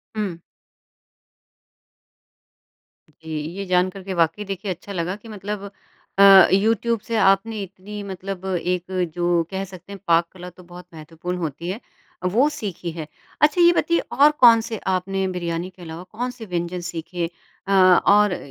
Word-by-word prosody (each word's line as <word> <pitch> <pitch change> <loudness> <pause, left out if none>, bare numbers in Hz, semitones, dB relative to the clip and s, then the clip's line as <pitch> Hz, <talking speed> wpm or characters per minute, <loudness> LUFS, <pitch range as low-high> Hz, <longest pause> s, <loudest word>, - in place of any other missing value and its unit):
हुँ। 200 -6 -3 2.7
जी, 160 +1 -15 0.3
ये 200 - -4
जान 180 0 +2
कर 190 0 -10
के 190 - -5
वाक़ई 170 +4 +1
देखिए 195 0 -4
अच्छा 185 +3 -7
लगा 180 +2 -2
कि 215 +2 -15
मतलब 200 -1 -6 0.5
अ, 195 -2 +9
यूट्यूब 225 +3 +2
से 230 - -4
आपने 200 +2 +2
इतनी 195 +2 -9
मतलब 190 0 -6
एक 180 0 -2 0.2
जो 175 -1 +1
कह 190 0 -3
सकते 185 0 -13
हैं 195 - -9
पाक 170 0 +4
कला 180 -1 -10
तो 180 +1 -17
बहुत 175 +1 -12
महत्वपूर्ण 165 +3 -6
होती 165 +1 -4
है 195 +5 -4 0.5
वो 260 +6 +4
सीखी 185 - -5
है। 160 -2 -7 0.3
अच्छा 305 +4 +4
ये 345 0 +7
बताइए 335 0 +1
और 290 +2 +5
कौन 230 -2 +8
से 225 -1 -5
आपने 190 +1 0
बिरयानी 175 -1 -3
के 185 -1 -18
अलावा 165 +1 -8
कौन 240 +7 -5
से 235 -3 -10
व्यंजन 175 -1 -3
सीखे? 170 0 -4 0.4
अ, - - -2
और 190 +1 +5
185 Hz, 160 wpm, -22 LUFS, 175-205 Hz, 2.7 s, अ